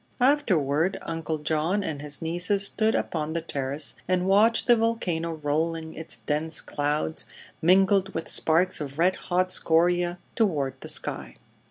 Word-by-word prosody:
Afterward 185 - +2
Uncle 165 -1 -3
John 155 +6 -1
and 150 -5 -4
his 145 +1 -3
nieces 180 +5 +2
stood 220 +2 +1
upon 155 -1 -2
the 170 - -1
terrace 140 -1 -2
and 180 0 +1
watched 210 +4 +3
the 240 - +6
volcano 180 -8 -1
rolling 160 +2 -2
its 160 - -3
dense 155 +2 -1
clouds, 150 +2 -2 0.4
mingled 195 +3 +3
with 165 - -3
sparks 170 +2 +3
of 140 -1 -6
red 180 +3 +3
hot 185 +1 -1
scoria, 175 +1 +2 0.2
toward 145 - 0
the - - -8
sky. - - -2
165 Hz, 145 wpm, -26 LUFS, 155-190 Hz, 0.4 s, the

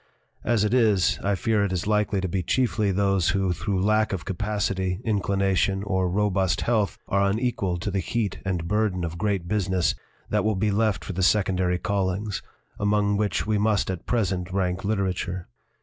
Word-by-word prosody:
As 115 -3 +2
it 105 +2 +1
is, 105 -5 +3
I 100 0 +1
fear 105 +2 +1
it 100 - -1
is 90 -2 -2
likely 105 -2 +1
to 95 - -1
be 95 +1 -1
chiefly 110 +1 +1
those 95 -2 +2
who 95 -1 +1
through 90 +4 -1
lack 110 +1 +2
of 95 - -4
capacity, 95 -1 -1
inclination, 100 -2 +1
or 95 -2 0
robust 95 -1 +1
health 110 -4 +1
are 100 0 +2
unequal 100 -4 -1
to 95 +4 -3
the 95 - 0
heat 105 +3 -2
and 90 -3 -2
burden 105 -3 0
of 85 0 -4
great 100 -4 -1
business 95 -3 +1 0.4
that - - +2
will 110 0 +1
be 105 +2 +1
left 105 -1 +1
for 95 - -4
the 95 - -2
secondary 95 -2 +2
callings, 100 +1 -1 0.4
among 105 0 +2
which 105 0 0
we 105 -1 +1
must 105 -2 +1
at 90 - -7
present 95 -6 0
rank 95 -1 -1
literature. 95 -3 -2
100 Hz, 180 wpm, -25 LUFS, 95-105 Hz, 0.4 s, is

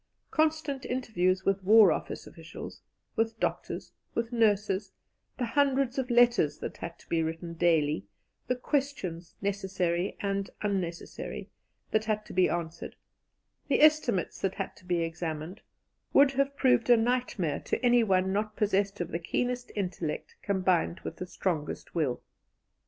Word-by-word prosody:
Constant 310 -3 +1
interviews 190 -7 0
with 195 0 +1
War 210 -1 +8
Office - - -3
officials, 165 0 -10 0.3
with 225 0 0
doctors, - - -2 0.2
with 230 0 -1
nurses; 210 -3 +2 0.4
the 250 - 0
hundreds 270 0 +2
of 260 -1 -2
letters 235 -11 +4
that - - -6
had 170 0 -7
to - - -20
be 165 -1 +1
written 165 +1 -3
daily; 155 - +2 0.4
the 250 - +1
questions, 250 - -2
necessary 190 -2 -1
and 200 -1 -1
unnecessary, 185 -5 -3 0.4
that 215 0 +2
had 215 -1 -1
to - - -10
be 185 0 +4
answered; 170 -1 -4 0.7
the 285 - +3
estimates 300 - +3
that 190 -1 0
had 195 - -4
to 185 - -19
be 175 -1 +1
examined, 165 +1 -4 0.5
would 280 0 +7
have 275 +1 0
proved 250 -3 +3
a 240 - +8
nightmare 225 - 0
to - - -2
anyone 195 -6 +4
not 210 +1 -1
possessed 200 -1 +1
of 170 - -3
the 170 - -1
keenest 245 +8 -2
intellect 180 -6 -3
combined 185 -3 +1
with - - -6
the 180 - -5
strongest 165 -5 -3
will. 150 -7 -1
195 Hz, 145 wpm, -29 LUFS, 175-240 Hz, 0.7 s, War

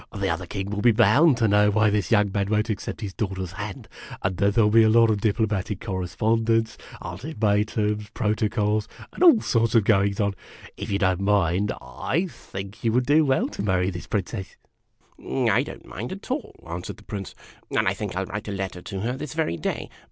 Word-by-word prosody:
The 100 -2 -2
other 85 +2 -3
king 100 +1 -4
will 105 0 -2
be 120 - +6
bound 145 +6 +5
to 115 -3 +2
know 105 0 +4
why 105 0 +3
this 100 -5 0
young 105 -3 +3
man 100 0 -1
won't 110 +1 +1
accept 105 +3 -5
his 100 -3 -5
daughter's 95 -4 -3
hand, 105 0 -7 0.4
and 95 -1 0
then 100 +2 +2
there 110 +2 +3
'11 105 - +3
be - - +7
a 110 - +5
lot 115 0 +5
of 105 -2 -1
diplomatic 105 -2 0
correspondence, 115 +4 0 0.3
ultimatums, 105 - -1
protocols, 105 -1 0 0.3
and - - -9
all 325 -11 +7
sorts 115 -1 +1
of 115 - +6
goings 100 -1 +2
on. 100 -1 +1 0.4
If 100 - -6
you 100 - +1
don't 95 -2 +1
mind, 100 -1 +2
I 175 +4 -2
think 100 +3 -9
you 115 - +2
would 125 +1 +2
do 150 +4 +5
\vell 130 - +2
to - - -6
marry 95 -2 +1
this 90 -1 -8
Princess." 95 0 -3 0.3
" - - -35 0.3
I - - +4
don't - - -8
mind 115 +6 -6
at 195 +6 -7
all," 270 0 -3
answered 85 +2 -6
the - - -16
Prince; 100 -3 -6 0.2
" - - -29
and - - +2
I - - +3
think - - -5
I 95 - 0
'11 95 - -6
write 105 +1 -4
a - - -3
letter 95 -2 -4
to 95 +1 -6
her 120 +4 -1
this 150 +2 -6
very 160 - 0
day. 80 - -3
105 Hz, 215 wpm, -24 LUFS, 95-115 Hz, 0.4 s, be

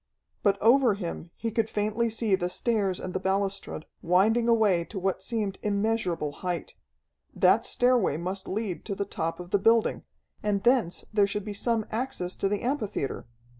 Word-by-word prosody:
But 200 -1 +2
over 240 -1 +5
him 170 -3 -5
he 230 - -3
could 225 0 0
faintly 215 +3 0
see 220 -2 -1
the 180 -2 +1
stairs 200 -2 0
and 185 - -5
the 185 - -1
balustrade, 195 -3 -1 0.2
winding 220 +7 +3
away 210 -7 +4
to 195 - -8
what 190 0 -1
seemed 205 -2 -2
immeasurable 200 -7 0
height. 180 -2 -3 0.6
That - - +4
stairway 245 - +2
must 185 +3 -4
lead 200 -3 -3
to 200 - -3
the 200 - -2
top 165 -4 -3
of 175 0 -9
the 200 - +3
building, 225 +2 +3 0.4
and 205 -2 0
thence 240 -8 +2
there 205 -2 +4
should 205 0 -3
be 210 - -4
some 225 +1 0
access 220 -6 -3
to 195 - 0
the 205 +2 -2
amphitheatre. 215 - -2
200 Hz, 170 wpm, -27 LUFS, 185-225 Hz, 0.6 s, over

